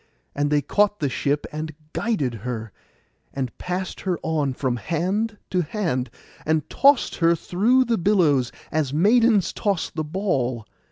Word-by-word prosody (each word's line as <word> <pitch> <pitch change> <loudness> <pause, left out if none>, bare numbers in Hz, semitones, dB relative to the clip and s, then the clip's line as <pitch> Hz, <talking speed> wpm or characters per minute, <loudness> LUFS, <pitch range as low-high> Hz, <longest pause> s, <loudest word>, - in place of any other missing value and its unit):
And 145 0 0
they 145 -1 +2
caught 205 +7 +2
the 145 - 0
ship, 145 +3 -1
and 155 0 -5 0.2
guided 170 - 0
her, 115 -2 -5 0.6
and 130 -3 -3
passed 180 +1 -4
her 185 -3 -1
on 150 -4 0
from 125 -1 -1
hand 190 - -1
to 180 - +2
hand, 155 - -2 0.3
and 155 -1 0
tossed 280 -1 +4
her 170 0 +4
through 230 +11 +2
the 230 -3 0
billows, 165 -10 +3 0.2
as 155 -4 0
maidens 210 - +3
toss 200 -5 -1
the 155 - -3
ball. 140 - -1
160 Hz, 150 wpm, -23 LUFS, 140-200 Hz, 0.6 s, tossed